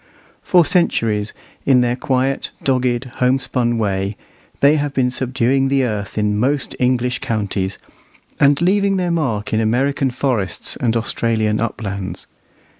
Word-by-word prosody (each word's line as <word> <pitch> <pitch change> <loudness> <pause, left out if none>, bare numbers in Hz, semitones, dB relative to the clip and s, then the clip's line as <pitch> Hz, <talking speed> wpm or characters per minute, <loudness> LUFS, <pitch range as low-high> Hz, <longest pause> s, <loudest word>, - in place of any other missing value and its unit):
For 175 -3 +4
centuries, 115 - +1 0.3
in 130 -2 +4
their 120 0 +1
quiet, 130 +1 -1
dogged, 125 -2 +1
homespun 125 -2 +1
way, 100 -2 -1 0.4
they 145 +2 +5
have 145 -1 -2
been 125 -1 +2
subduing 130 +1 +1
the 135 0 +2
earth 105 -4 -3
in 105 -1 +1
most 135 +4 0
English 125 0 +1
counties, 100 -3 -2 0.6
and 140 -1 +4
leaving 195 +1 +2
their 180 -2 0
mark 120 -12 -1
in 110 - +2
American 135 +5 +1
forests 120 -8 -1
and 115 -1 0
Australian 110 -1 0
uplands. 100 -4 -4
125 Hz, 130 wpm, -19 LUFS, 110-135 Hz, 0.6 s, they